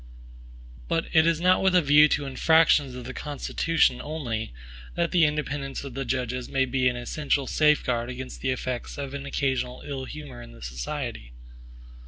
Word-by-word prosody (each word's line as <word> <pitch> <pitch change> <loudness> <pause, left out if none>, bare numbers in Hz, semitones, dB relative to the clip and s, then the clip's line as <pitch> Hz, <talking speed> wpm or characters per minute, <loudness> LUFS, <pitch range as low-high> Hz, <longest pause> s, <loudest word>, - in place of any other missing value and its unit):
But 165 0 0
it 160 -1 +5
is 165 -1 +2
not 180 +2 +4
with 190 -1 +3
a 180 - +6
view 145 +1 +7
to 145 -1 0
infractions 145 -1 +3
of 125 - -7
the 125 - -6
Constitution 145 -1 0
only, 125 - -4 0.4
that 170 -1 0
the 175 -3 +5
independence 145 -2 -2
of 140 -3 -7
the 135 +1 -4
judges 125 0 -2
may 135 -1 +2
be 130 0 +1
an 125 - +1
essential 140 +3 -1
safeguard 130 -6 +2
against 130 0 -7
the 135 - -1
effects 130 0 -3
of 140 -1 -5
occasional 135 -2 -2
ill 135 -2 -5
humors 135 -5 -9
in - - -14
the - - -13
society. - - -5
135 Hz, 170 wpm, -26 LUFS, 125-150 Hz, 0.4 s, view